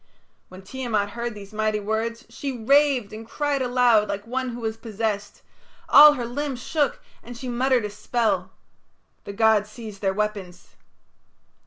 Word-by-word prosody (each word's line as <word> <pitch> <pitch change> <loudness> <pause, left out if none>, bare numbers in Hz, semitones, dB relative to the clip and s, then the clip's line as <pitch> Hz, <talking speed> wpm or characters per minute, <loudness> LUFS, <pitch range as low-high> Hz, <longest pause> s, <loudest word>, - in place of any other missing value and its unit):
When 185 +1 -12
Tiamat 215 -3 -2
heard 235 0 -4
these 200 0 -11
mighty 215 0 0
words 225 +3 -3
she 275 -3 -5
raved 275 -4 +3
and 220 +1 -7
cried 285 +4 -2
aloud 245 -4 +3
like 200 +1 -4
one 255 +2 -3
who 235 -1 -6
is 220 0 -2
possessed; 215 -2 -4 0.4
all 300 +1 +9
her 250 -4 -4
limbs 265 +1 -4
shook, 290 +3 -1 0.2
and 240 0 -10
she 255 - -7
muttered 250 -1 +1
a - - -3
spell. 225 +2 -1 0.8
The 200 - -6
gods 215 -1 +3
seized 215 -3 -10
their 195 -2 +1
weapons. 200 -4 -4
230 Hz, 155 wpm, -24 LUFS, 210-255 Hz, 0.8 s, all